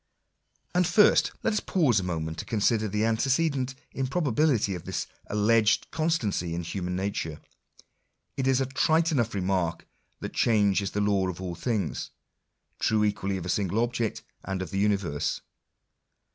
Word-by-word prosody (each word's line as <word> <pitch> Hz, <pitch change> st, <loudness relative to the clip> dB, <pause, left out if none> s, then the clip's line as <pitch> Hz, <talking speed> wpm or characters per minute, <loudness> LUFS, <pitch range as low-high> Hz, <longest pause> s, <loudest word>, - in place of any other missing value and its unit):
And 180 Hz, -1 st, +3 dB
first, 205 Hz, +4 st, +5 dB
let -, -, +1 dB
us 210 Hz, -, +1 dB
pause 140 Hz, -, +2 dB
a -, -, -3 dB
moment 80 Hz, -2 st, -3 dB
to -, -, -5 dB
consider 110 Hz, 0 st, +1 dB
the 105 Hz, +2 st, 0 dB
antecedent 130 Hz, +3 st, +1 dB, 0.2 s
improbability 135 Hz, -, +1 dB
of 90 Hz, -3 st, -7 dB
this -, -, -3 dB, 0.2 s
alleged 110 Hz, +1 st, +2 dB
constancy 110 Hz, -, 0 dB
in 85 Hz, -, -3 dB
human 90 Hz, +1 st, -3 dB
nature. 95 Hz, -5 st, -3 dB, 1.0 s
It 135 Hz, -1 st, -1 dB
I -, -, +4 dB
is 130 Hz, -1 st, +3 dB
a -, -, +1 dB
trite 160 Hz, +5 st, +2 dB
enough 120 Hz, -7 st, 0 dB
remark 90 Hz, -3 st, -1 dB, 0.3 s
that -, -, -6 dB
change 105 Hz, -4 st, +3 dB
is 100 Hz, -, -2 dB
the 105 Hz, -, -2 dB
law 100 Hz, -2 st, +2 dB
of 90 Hz, -1 st, -5 dB
all 90 Hz, -2 st, -4 dB
things: 100 Hz, -2 st, -2 dB, 0.7 s
i -, -, -9 dB
true 110 Hz, -1 st, +3 dB
equally 100 Hz, -2 st, 0 dB
of 90 Hz, -, -6 dB
a -, -, -4 dB
single 100 Hz, +2 st, 0 dB
object, 120 Hz, -2 st, -2 dB, 0.2 s
and 95 Hz, -1 st, -3 dB
of 85 Hz, -, -8 dB
the 95 Hz, -, -1 dB
universe. 100 Hz, -8 st, 0 dB
105 Hz, 165 wpm, -27 LUFS, 95-130 Hz, 1.0 s, first